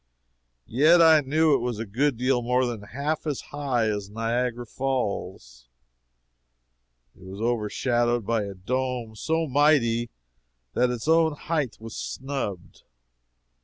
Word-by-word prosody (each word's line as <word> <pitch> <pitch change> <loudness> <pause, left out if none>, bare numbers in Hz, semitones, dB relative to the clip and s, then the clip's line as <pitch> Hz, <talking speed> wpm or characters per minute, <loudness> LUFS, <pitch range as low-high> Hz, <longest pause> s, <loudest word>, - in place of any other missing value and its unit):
Yet 155 - +5
I 160 -2 +7
knew 155 +3 +2
it 135 - +3
was 120 -2 -3
a 115 - -4
good 125 +5 0
deal 125 0 +1
more 125 +2 +1
than 120 -4 -4
half 140 +10 -3
as 145 -3 -1
high 135 -6 0
as 105 -2 -3
Niagara 120 +2 -2
Falls. 100 - -4 1.5
It - - -21
was 95 +2 -9
overshadowed 120 +1 0
by 115 -1 0
a 100 -1 -7
dome 125 +3 -3
so 160 +8 -1
mighty 130 -5 +2 0.6
that 125 +1 +2
its 125 +2 -4
own 160 -1 +4
height 145 -4 -2
was 110 0 -9
snubbed. 130 -9 -5
125 Hz, 130 wpm, -25 LUFS, 110-140 Hz, 1.5 s, I